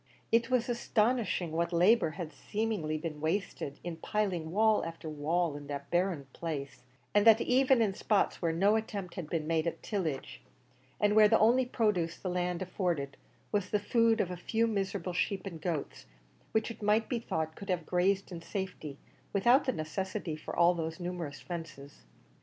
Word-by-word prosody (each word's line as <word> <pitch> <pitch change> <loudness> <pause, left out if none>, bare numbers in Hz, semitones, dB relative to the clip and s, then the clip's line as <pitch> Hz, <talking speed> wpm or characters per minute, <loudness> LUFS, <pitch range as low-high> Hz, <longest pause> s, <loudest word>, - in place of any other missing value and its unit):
It 230 +2 +3
was 250 -2 +2
astonishing 235 -6 +1
what 170 +2 0
labour 180 +3 +4
had 165 -4 -5
seemingly 210 -8 -2
been 155 -2 -5
wasted 160 -4 -2
in 175 -2 -5
piling 185 -5 -1
wall 215 +4 +3
after 165 -1 -7
wall 155 +2 0
in 145 -1 -8
that 140 -1 -6
barren 175 -4 +1
place, 145 -5 -5 0.3
and 205 +1 +5
that 225 0 +8
even 255 -1 +4
in 200 -3 0
spots 205 +1 +1
where 170 -2 +1
no 195 +6 +3
attempt 205 -5 -3
had 165 -4 -6
been 160 -3 -1
made 160 0 +1
at 170 - -4
tillage, 165 -10 -3 0.6
and 210 0 +3
where 215 -1 +8
the - - +5
only 245 +3 +4
produce 195 -9 0
the 185 - -4
land 180 0 -1
afforded 175 -7 -2 0.4
was 200 -3 0
the 210 - +2
food 230 +2 +3
of 180 - 0
a 180 - -5
few 225 +6 0
miserable 195 -4 -2
sheep 190 +2 -1
and 170 -5 -7
goats, 165 -4 -4 0.4
which 220 +1 0
it 230 - -11
might 210 +2 +2
be 240 - -1
thought 160 -7 -3
could 200 - -10
have 175 -3 0
grazed 190 +3 +1
in 170 -2 -6
safety 170 -5 -5 0.4
without 240 +7 +4
the 260 - +2
necessity 185 0 -3
for 155 - -7
all 175 +1 +5
those 165 0 -4
numerous 175 -5 -5
fences. 155 - -8
180 Hz, 180 wpm, -31 LUFS, 165-210 Hz, 0.6 s, that